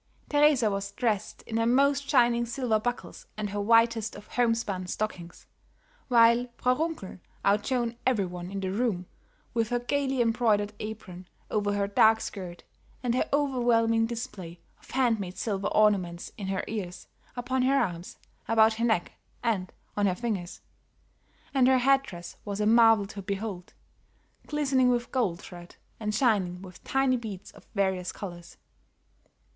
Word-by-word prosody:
Teresa 290 -7 +4
was 200 0 -3
dressed 215 -5 -2
in 225 - -4
her 230 0 +2
most 280 +3 +3
shining 240 -3 +4
silver 240 -3 0
buckles 245 +3 -5
and 210 -2 -3
her 205 0 -2
whitest 230 0 +3
of 205 - -12
homespun 230 -6 0
stockings, 180 -4 -5 0.6
while 235 0 +5
Frau 250 - +2
Runkel 310 - -4 0.3
outshone 230 +4 +1
every 230 -7 +2
one 180 0 -7
in 195 0 -4
the 190 -1 -2
room 200 -4 -1 0.5
with 230 -1 0
her 245 - +1
gayly 270 +2 -1
embroidered 225 -3 +2
apron 195 -4 -7 0.2
over 205 -1 0
her 200 0 +1
dark 220 +2 +5
skirt, 180 -6 -7 0.4
and 240 -2 +1
her 255 - 0
overwhelming 240 -5 +2
display 190 -7 -6 0.2
of - - -21
hand 245 -4 +2
made 185 -2 -6
silver 200 -3 -2
ornaments 190 -5 +1
in 195 - -6
her 190 -1 -1
ears, 190 -5 -5 0.3
upon 255 +2 -1
her 270 +2 +3
arms, 175 -8 -2 0.3
about 220 0 +5
her 230 +2 -1
neck, 220 -7 +1 0.3
and 200 -6 -1 0.2
on 205 -1 +2
her 185 - +1
fingers. 195 -5 -4 0.9
And 260 -2 +4
her 260 0 +5
head 270 +2 +4
dress 175 -9 -10
was 205 -1 -4
a 210 - +1
marvel 225 -2 +6
to 200 0 -8
behold, 195 -2 -5 0.7
glistening 270 -4 +2
with 240 -1 0
gold 210 -10 0
thread 175 0 -11 0.2
and 210 -1 -2
shining 195 -8 +1
with 185 -1 -12
tiny 270 -1 +2
beads 210 -6 -7
of - - -18
various 190 -3 0
colors. 175 -3 -9
220 Hz, 155 wpm, -28 LUFS, 195-245 Hz, 0.9 s, marvel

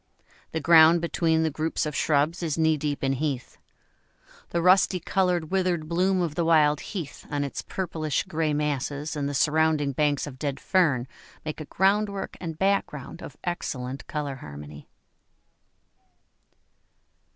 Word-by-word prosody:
The 160 - -2
ground 165 +1 +7
between 165 -1 +1
the 160 - 0
groups 155 +2 -1
of 150 -2 -4
shrubs 155 +5 +1
is 160 -3 -1
knee 160 -1 +3
deep 145 -1 -3
in 135 0 +2
heath. 135 -2 -3 0.9
The 170 - -1
rusty 185 +1 +4
coloured 180 -2 0
withered 180 -4 0
bloom 185 +3 +1
of 170 -4 -1
the 170 - 0
wild 150 -3 +4
heath 170 -9 -7
on 145 -1 -1
its 140 - -4
purplish 160 -5 -2
grey 155 -1 -1
masses 145 0 -2
and 145 -1 -2
the 145 - -4
surrounding 155 0 +2
banks 145 +1 +1
of 130 -3 -9
dead 140 -1 -3
fern 145 -10 +2 0.4
make 155 0 -5
a - - -6
groundwork 200 +3 0
and 165 -3 -5
background 190 -8 -1
of 145 - -10
excellent 135 -7 -4
colour 145 -3 -4
harmony. 75 - -10
155 Hz, 145 wpm, -26 LUFS, 145-170 Hz, 0.9 s, ground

